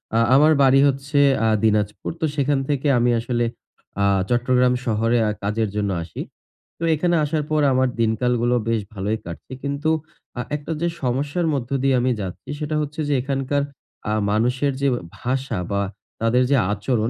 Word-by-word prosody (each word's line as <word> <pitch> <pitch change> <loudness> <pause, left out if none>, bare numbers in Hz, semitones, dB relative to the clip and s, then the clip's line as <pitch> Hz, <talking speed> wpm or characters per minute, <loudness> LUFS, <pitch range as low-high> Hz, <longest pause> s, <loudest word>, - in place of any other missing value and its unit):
আ - - +4 0.2
আমার 155 +3 +6
বাড়ি 135 0 +5
হচ্ছে 140 +1 0 0.3
আ - - +3 0.2
দিনাজপুর। 105 -1 +1
তো - - +2
সেখান 140 -1 +1
থেকে 145 0 0
আমি 120 0 +3
আসলে 120 0 -1 0.6
আ - - +4 0.2
চট্টগ্রাম 125 +1 +3
শহরে 115 +1 +1
আ - - +1
কাজের 105 +1 0
জন্য 100 -1 0
আসি। 80 - -7 0.6
তো - - -5
এখানে 175 +2 +1
আসার 150 +1 0
পর 155 - +2
আমার 130 0 +3
দিনকালগুলো 120 +2 +1
বেশ 115 -2 +1
ভালই 105 +3 -2
কাটছে। 85 +9 -8
কিন্তু 140 +2 -1 0.5
আ - - 0
একটা 150 +2 -6
যে 170 - +2 0.2
সমস্যার 145 +7 0
মধ্য 125 -3 -3
দিয়ে 135 -1 +3
আমি 130 - +2
যাচ্ছি 95 +7 -7
সেটা 155 0 -2
হচ্ছে 150 +2 -5
যে 145 - +1
এখানকার 135 +1 -1 0.5
আ - - +1 0.2
মানুষের 125 +6 +1
যে 140 - +3
আ - - -2 0.2
ভাষা 130 -4 -2
বা 100 0 +1 0.4
তাদের 120 +3 +3
যে 140 - +5 0.2
আচরণ 110 +2 0
125 Hz, 170 wpm, -22 LUFS, 115-140 Hz, 0.6 s, আমার